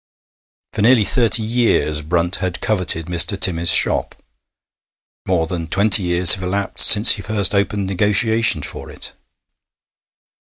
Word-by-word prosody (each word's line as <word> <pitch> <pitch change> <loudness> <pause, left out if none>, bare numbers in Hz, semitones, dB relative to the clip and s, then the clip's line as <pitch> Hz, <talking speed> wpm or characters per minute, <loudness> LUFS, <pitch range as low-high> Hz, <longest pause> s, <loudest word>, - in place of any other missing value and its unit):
For - - -6
nearly 115 +1 +1
thirty 115 0 0
years 110 -10 -3
Brunt 85 +3 -3
had 90 -2 -7
coveted 90 -6 -1
Mr. 90 +4 +1
Timmis's 85 -2 +1
shop; - - -1 1.1
more 90 -3 -3
than 85 -1 -8
twenty 100 +4 +3
years 90 -1 +4
have 95 - -7
elapsed 100 +2 +1
since 105 +3 +7
he 100 - 0
first 105 0 -1
opened 100 0 -4
negotiations 105 -2 0
for - - -11
it. - - -8
95 Hz, 130 wpm, -15 LUFS, 85-110 Hz, 1.1 s, since